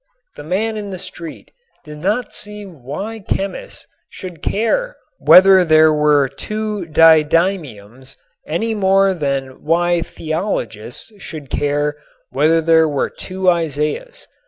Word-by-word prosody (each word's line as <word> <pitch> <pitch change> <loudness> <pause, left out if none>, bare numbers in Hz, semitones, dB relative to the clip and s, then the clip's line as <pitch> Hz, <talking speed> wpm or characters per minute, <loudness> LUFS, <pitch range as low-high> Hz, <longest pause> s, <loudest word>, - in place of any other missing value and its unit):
The - - -9
man 215 +7 -2
in 205 -1 -6
the 190 - -6
street 170 -3 -9 0.3
did 150 0 -10
not 210 +9 -1
see 210 0 -7
why 180 - -7
chemists 200 - -5 0.2
should 180 -4 -10
care - - -1 0.2
whether 190 0 +7
there 155 -1 +5
were 150 -2 +3
two 210 +6 -5
didymiums 155 - +2 0.3
any 220 +9 -1
more 195 -1 +3
than 140 -5 -3
why 175 +2 +1
theologians 155 - -4
should 150 -7 -9
care 145 +1 -1 0.3
whether 160 +4 +2
there 160 -1 +4
were 145 -2 -1
two 185 0 -5
Isaiahs. 165 - -1
165 Hz, 120 wpm, -18 LUFS, 150-195 Hz, 0.3 s, whether